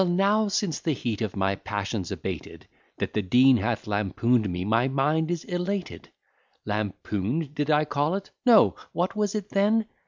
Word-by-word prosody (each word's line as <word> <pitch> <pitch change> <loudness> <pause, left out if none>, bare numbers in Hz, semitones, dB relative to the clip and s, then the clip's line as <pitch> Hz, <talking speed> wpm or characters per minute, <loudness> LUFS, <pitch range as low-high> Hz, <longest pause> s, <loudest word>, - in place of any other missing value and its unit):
now, 195 +4 +2
since 195 -5 -1
the 160 - 0
heat 120 -5 -3
of 110 -4 -2
my 95 0 +1
passion's 100 -1 -4
abated, - - -6 0.3
That - - -3
the 105 - +1
Dean 125 +7 +5
hath 110 +2 -2
lampoon'd 105 +2 +1
me, 90 +1 -3
my 115 +4 +2
mind 150 +4 +1
is 175 -2 -2
elated: 180 +1 -4 0.6
Lampoon'd 105 - -2
did 145 0 -2
I 150 0 +3
call 145 +4 0
it? 195 0 -6
No 235 -5 +6 0.2
what 175 +5 -1
was 210 -1 0
it 210 -1 -4
then? 210 +3 +2
145 Hz, 165 wpm, -26 LUFS, -, 0.6 s, No